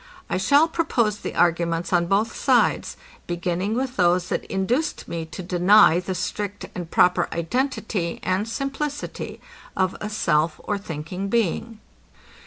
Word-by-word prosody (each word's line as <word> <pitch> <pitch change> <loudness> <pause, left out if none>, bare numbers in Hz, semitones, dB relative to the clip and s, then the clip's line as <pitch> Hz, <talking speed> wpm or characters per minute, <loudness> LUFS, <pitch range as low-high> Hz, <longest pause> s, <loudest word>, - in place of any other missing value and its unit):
I - - +1
shall 285 - +4
propose 235 -11 0
the - - -6
arguments 170 +1 +1
on 170 -1 +3
both 210 +5 +1
sides, - - +2 0.3
beginning 175 +4 -1
with 260 0 -2
those 180 -1 +2
that - - -2
induced 235 +11 -1
me 165 -1 -4
to 185 - -7
deny 180 0 +5
the 185 +1 -4
strict 205 +3 -4
and 175 -2 -6
proper 180 0 +3
identity 190 - -2
and 190 +4 0
simplicity 275 +3 -4 0.4
of 185 -1 +1
a 210 - -3
self 160 -6 +1
or 205 -1 -2
thinking 180 +1 -5
being. 225 +1 -1
190 Hz, 140 wpm, -23 LUFS, 175-225 Hz, 0.4 s, deny